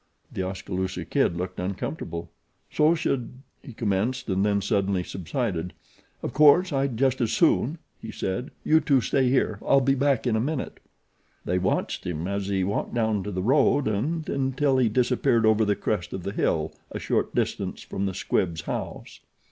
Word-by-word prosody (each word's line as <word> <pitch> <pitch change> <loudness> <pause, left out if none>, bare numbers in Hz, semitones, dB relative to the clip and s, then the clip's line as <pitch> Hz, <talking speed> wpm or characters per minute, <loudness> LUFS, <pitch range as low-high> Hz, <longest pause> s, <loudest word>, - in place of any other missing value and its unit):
The - - -2
Oskaloosa 95 0 -3
Kid 85 - +1
looked 90 +1 -4
uncomfortable. 90 - -4 0.4
"So 155 +2 +4
should 135 -7 -2 0.2
" - - -44
he - - -9
commenced, 115 +4 -1
and 95 0 +1
then 100 -1 +2
suddenly 100 -2 0
subsided. 90 - -3 0.5
"Of - - -3
course 155 +4 +6
I'd 135 -3 0
just 130 0 +2
as 115 - +1
soon," 160 -2 +2 0.2
he 110 - -7
said. 95 +5 -3
"You 160 - +5
two 140 -3 +3
stay 130 +1 +2
here 110 -5 +1
I'll 140 - +4
be 135 +1 +2
back 135 -2 +1
in 120 -3 +2
a - - +2
minute." 145 +2 -3 0.7
They 90 - +1
watched 90 - -1
him 85 0 -3
as 100 0 -2
he 95 -2 0
walked 100 +5 -2
down 110 -3 +1
to 105 - -3
the 95 -1 -3
road 140 +3 +3
and 150 +10 -1
until 135 0 +1
he 120 -3 +3
disappeared 120 -1 +2
over 110 0 +4
the 105 0 +2
crest 95 -3 -2
of 95 - -5
the 100 - -4
hill - - 0 0.2
a - - -5
short - - -1
distance - - -2
from 100 +1 -3
the 95 - -4
Squibbs' 85 -4 -1
house. - - -6
110 Hz, 180 wpm, -26 LUFS, 95-135 Hz, 0.7 s, course